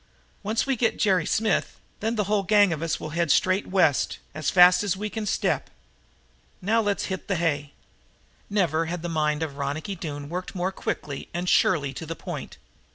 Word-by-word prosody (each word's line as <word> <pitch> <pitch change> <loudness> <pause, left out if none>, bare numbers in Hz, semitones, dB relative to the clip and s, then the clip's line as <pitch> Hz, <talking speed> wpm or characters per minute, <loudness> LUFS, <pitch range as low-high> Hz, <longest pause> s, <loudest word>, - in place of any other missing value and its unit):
"Once 215 +2 0
we 270 -1 +1
get 230 -1 +1
Jerry 185 -6 +2
Smith, 220 -2 0 0.2
then 225 +2 -1
the 210 - +1
whole 205 +1 +1
gang 205 -1 +4
of 155 - -5
us 165 -1 -1
will 155 - -6
head 170 +1 0
straight 185 +6 +3
West, 180 -7 +2 0.2
as 155 0 -1
fast 180 0 +7
as 195 -2 0
we 210 +1 -4
can 220 -2 -4
step. - - 0 0.9
Now 220 +5 +2
let's 205 -2 0
hit 190 -1 -5
the 195 - 0
hay." 150 -4 -1 0.8
Never 165 -5 +1
had 175 0 -4
the 175 - -3
mind 155 -1 0
of 140 -3 -5
Ronicky 145 +8 -3
Doone 145 -4 -6
worked 180 +5 -5
more 185 +1 -1
quickly 145 -6 -5
and 175 +1 -2
surely 145 -7 +3
to 160 - -7
the 165 - -4
point. - - -7
180 Hz, 190 wpm, -25 LUFS, 155-205 Hz, 0.9 s, fast